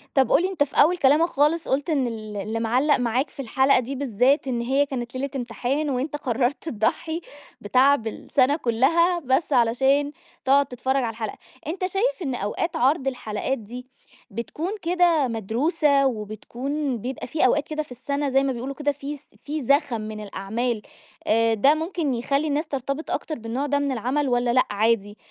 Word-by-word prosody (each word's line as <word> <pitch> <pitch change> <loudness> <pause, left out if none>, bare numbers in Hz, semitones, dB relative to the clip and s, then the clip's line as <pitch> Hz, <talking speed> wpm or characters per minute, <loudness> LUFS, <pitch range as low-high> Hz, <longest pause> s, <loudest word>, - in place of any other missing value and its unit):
طَب 265 -4 +3
قُل - - +5
لي 370 - +1
أنت 355 -7 +1
في 285 - -13
أول 345 +5 +3
كلامك 300 +2 +4
خالص 305 +2 +1
قُلت 285 +5 0
إن 275 -5 +1
ال 215 -3 -6
اللي 220 +3 -3
مِعلَّق 255 +6 +2
معاك 245 +3 0
في 275 - -7
الحلقة 265 +2 +3
دي 255 +3 -5
بالذات، 265 +2 +2
إن 240 -2 -1
هي 270 +4 +2
كانت 245 -2 -5
ليلة 275 +2 -3
امتحان 255 +4 -2
وأنت 270 +3 -2
قرّرت 260 +3 -1
تضحي 320 +8 -1 0.4
بتعب 255 +3 +3
السنة 260 +5 +1
كلّها، 330 +8 +2
بس 275 0 0
علشان 270 +4 +3 0.3
تقعد 275 +1 +4
تتفرّج 260 +1 -2
على 230 - -1
الحلقة، 220 -2 -5 0.3
أنت 330 +5 -4
شايف 405 +3 -1
إن 265 -5 -2
أوقات 210 - -2
عرض 270 +2 +2
الحلقات 250 +1 -3
دي، 245 +4 -9 0.4
بتكون 265 - -4
كده 340 -5 +3
مدروسة 275 - +1
وبتكون 245 +4 -3
بيبقى 250 +4 -5
في 280 0 +2
أوقات 290 +4 +1
كده 310 0 -2
في 295 - -12
السنة 280 +3 -2
زي 270 0 +3
ما 275 -1 0
بيقولوا 255 +3 -5
كده 290 0 0
في 285 +1 -6
ز 280 - -18 0.2
في 300 0 -5
زخم 270 -3 +2
من 215 0 -6
الأعمال، 215 +3 -3 0.4
آآ 225 +1 +3
ده 275 +8 +4
ممكن 320 -3 -2
يخلّي 275 +6 0
الناس 295 +3 0
ترتبط 275 +2 -4
أكتر 310 - -3
بالنوع 235 +5 -3
ده 285 0 +1
من 285 -1 -1
العمل 260 +4 -1
والّا 245 -1 +1
لأ 255 +1 +4
عادي، 210 -1 +1
265 Hz, 180 wpm, -24 LUFS, 235-290 Hz, 0.4 s, قُل